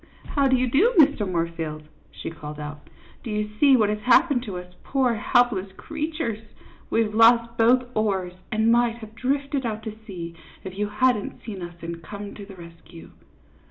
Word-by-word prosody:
How 280 -2 +2
do 260 - +4
you 255 0 +1
do, 370 - +3
Mr. 285 - +5
Moorfield," 165 -3 -3 0.3
she - - -7
called 150 -2 -8
out. 150 0 -8
" - - -26
Do - - -6
you 210 0 -2
see 275 -3 +6
what 215 -3 +3
has 210 0 -1
happened 250 +4 +4
to 195 -5 -5
us 180 0 -9
poor 260 -3 +1
helpless 220 -4 +2
creatures? 310 -7 -3 0.5
We 230 - +3
've 210 -1 -4
lost 230 +1 +5
both 240 +2 +4
oars, 195 -4 0 0.2
and 220 +1 +3
might 235 -1 +3
have 220 -2 -11
drifted 275 +3 -1
out 220 -2 -3
to 220 -1 -5
sea 170 -4 -6 0.3
if 190 0 -7
you 205 +1 -1
hadn't 210 0 0
seen 200 -5 -6
us 175 0 -7
and 165 0 -6
come 200 +4 -8
to 200 -1 -10
the 195 - -11
rescue." 170 -1 -13
215 Hz, 190 wpm, -24 LUFS, 185-250 Hz, 0.5 s, see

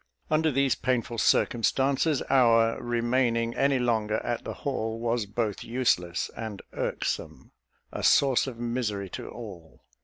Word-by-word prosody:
Under 155 +1 +3
these 140 -2 +2
painful 120 -2 -1
circumstances, 135 +7 +2
our 115 -4 +3
remaining 120 -1 0
any 140 +1 +2
longer 110 -3 0
at 120 - -2
the - - -6
Hall 115 -5 -2
was 115 -2 -1
both 105 0 -2
useless 90 -8 0
and 110 -3 -6
irksome - - -3 0.4
a - - -5
source 135 -2 +4
of 125 -3 -6
misery 115 -5 -2
to - - -7
all. 95 -9 -11
120 Hz, 130 wpm, -27 LUFS, 110-130 Hz, 0.4 s, source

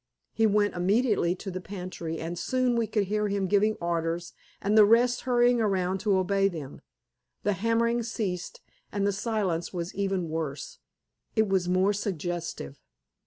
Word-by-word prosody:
He 225 0 +3
went 205 0 +2
immediately 195 -1 +2
to 190 +1 -7
the 185 0 -5
pantry, 180 -4 -6
and 165 +2 -4
soon 250 +7 0
we 230 -1 +1
could 210 -2 +1
hear 210 +2 0
him 200 -1 0
giving 210 +3 +2
orders 170 0 -2 0.3
and 205 +2 0
the 215 - +9
rest 235 +3 +4
hurrying 245 -1 +4
around 190 -3 0
to 200 -1 +2
obey 195 +1 +2
them. 155 -8 -7 0.6
The 205 - +2
hammering 230 +4 +1
ceased, 205 -6 -4 0.3
and 200 -1 -1
the 200 - +2
silence 200 -5 -1
was 175 -1 -4
even 195 -3 -1
worse. 155 -3 -4 0.6
It 220 -1 +3
was 190 -2 +1
more 185 +3 +3
suggestive. 175 - -4
195 Hz, 160 wpm, -28 LUFS, 175-215 Hz, 0.6 s, the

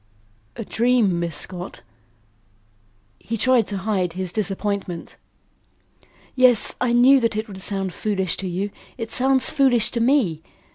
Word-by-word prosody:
"A 230 - -6
dream, 230 -7 +2
Miss 170 -3 -2
Scott?" 180 0 -4 1.4
He 230 - -4
tried 250 -1 +3
to 200 - -4
hide 190 -3 -1
his 185 -1 -4
disappointment. 200 -3 -3 1.2
"Yes; 250 -4 +4
I 250 -1 +1
knew 250 +3 +6
that 230 -3 0
it 215 +2 -3
would 190 -2 -10
sound 195 -2 -4
foolish 190 -2 -1
to 195 - -4
you; 190 +3 -3 0.3
it 225 -2 -5
sounds 265 0 +2
foolish 250 -6 +3
to 235 - -2
me. 230 - +2
210 Hz, 140 wpm, -22 LUFS, 190-245 Hz, 1.4 s, knew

